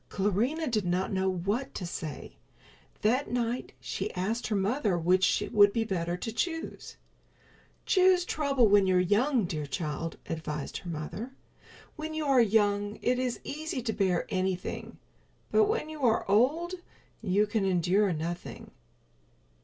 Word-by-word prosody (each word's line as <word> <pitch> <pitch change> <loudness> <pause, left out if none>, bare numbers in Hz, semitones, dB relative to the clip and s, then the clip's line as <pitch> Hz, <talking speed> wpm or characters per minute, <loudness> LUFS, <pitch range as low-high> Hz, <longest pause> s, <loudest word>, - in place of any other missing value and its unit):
Clarinha 220 - 0
did 220 -5 0
not 180 +2 -1
know 190 0 +1
what 200 +8 -2
to 185 - -4
say. 160 -4 -6 0.7
That 250 +6 +2
night 245 0 -2
she - - -4
asked 220 +6 -1
her 215 - -1
mother 205 0 +1
which 180 +3 +3
would 205 -3 +6
be 225 +2 0
better 175 -4 -2
to 225 - -4
choose. 325 +8 -4 0.9
"Choose 370 -2 +4
trouble 275 -8 +2
when 200 -1 +5
you're 185 -1 +4
young, 215 +6 +2
dear 155 -4 -4
child," 155 +1 -4
advised 150 -3 -4
her 175 - -8
mother. 170 +11 -5 0.6
"When 310 0 -5
you 310 -1 -2
are 270 -3 +5
young 205 -1 +2
it 250 +1 +2
is 255 -2 -1
easy 305 -3 -4
to 225 -2 -1
bear 185 -4 +1
anything, 185 -1 -3 0.5
but 430 - +5
when 435 -5 -1
you 310 -1 -8
are 230 -2 +2
old 280 - +2 0.5
you 205 0 +2
can 210 0 -1
endure 190 +2 +2
nothing." 170 +2 -5
205 Hz, 145 wpm, -29 LUFS, 185-255 Hz, 0.9 s, would